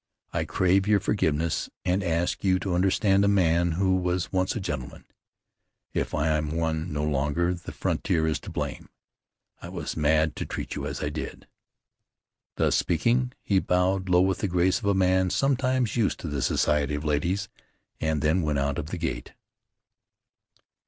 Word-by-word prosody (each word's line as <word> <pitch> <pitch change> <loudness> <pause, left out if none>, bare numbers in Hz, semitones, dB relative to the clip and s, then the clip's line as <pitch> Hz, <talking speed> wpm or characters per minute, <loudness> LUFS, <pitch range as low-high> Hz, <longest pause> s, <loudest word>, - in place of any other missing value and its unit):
I - - 0
crave 95 +2 +2
your 105 -1 +4
forgiveness, 85 -5 0 0.2
and 90 +2 +1
ask 85 0 -1
you 95 -2 +3
to 95 0 -3
understand 95 +2 +3
a - - +3
man 85 -4 +3
who 95 +2 +2
was 90 -1 -1
once 95 0 0
a - - -1
gentleman. 75 -9 -5 0.9
If - - -1
I 75 +1 +1
am 75 +1 0
one 80 0 -1
no 75 0 -2
longer, 75 +4 0
the 85 - -8
frontier 85 -5 0
is 80 -3 0
to - - -9
blame. - - -5 0.7
I - - -8
was - - -5
mad 80 0 +2
to - - -3
treat - - -5
you - - -4
as - - -4
I 75 - 0
did." 75 +1 -6 1.1
Thus - - +2
speaking, 120 +9 +1
he 100 -2 +2
bowed 95 +1 +1
low 90 0 +5
with 95 0 +1
the 100 - 0
grace 90 +3 +2
of 115 - -8
a 100 -1 +3
man 95 0 +3
sometimes 130 -1 +1
used 115 -5 +1
to - - -5
the 75 -3 -2
society 75 +3 +1
of 75 +2 -5
ladies, 85 +7 0 0.5
and 80 -2 -1
then 80 +4 +3
went 75 -3 0
out 70 0 0
of 75 - -5
the 90 - -5
gate. - - -4
90 Hz, 175 wpm, -26 LUFS, 80-95 Hz, 1.1 s, low